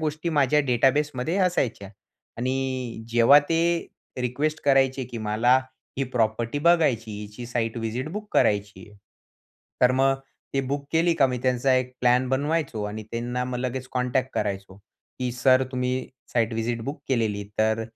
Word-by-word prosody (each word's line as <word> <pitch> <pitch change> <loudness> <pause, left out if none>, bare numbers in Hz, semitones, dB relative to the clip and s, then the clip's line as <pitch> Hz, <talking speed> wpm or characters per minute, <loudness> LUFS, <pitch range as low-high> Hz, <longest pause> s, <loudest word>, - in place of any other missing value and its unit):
गोष्टी, 155 +2 -2
माझ्या 150 -1 +3
डेटाबेसमध्ये 140 - +1
असायच्या. 120 - -1 0.5
आणि 130 -2 -2
जेव्हा, 120 +5 +7
ते 165 +3 +1 0.4
रिक्वेस्ट 145 +6 -1
करायचे 135 -1 +3
की 120 -1 -7
मला, 110 +4 +3 0.4
ही 135 - +1
प्रॉपर्टी 115 +1 -1
बघायची, 145 -9 +3
हिची 105 +3 -8
साईट 115 -1 -2
विजिट 115 +6 -3
बुक 210 +1 -5
करायची 105 0 +1
आहे. 105 - -18 0.8
तर 125 0 +6
मग 135 +1 +3 0.4
ते 135 - +2
बुक 140 0 -2
केली, 165 +1 +3
का 140 -4 +4
मी 125 -1 -3
त्यांचा 130 +1 +2
एक 130 0 0
प्लॅन 125 +1 +3
बनवायचो 140 -4 -1
आणि 105 +1 -5
त्यांना, 120 +2 -2
मग 125 -1 -4
लगेच 130 0 -3
कॉन्टॅक्ट 130 +1 0
करायचो, 100 -2 -3 0.4
की 125 -1 -1
सर, 130 +1 +4
तुम्ही 125 0 -2 0.2
साइट 115 -1 +1
विजिट 115 +1 -2
बुक 140 +2 -5
केलेली. 110 -5 0
तर 110 +1 +2
125 Hz, 150 wpm, -25 LUFS, 115-135 Hz, 0.8 s, जेव्हा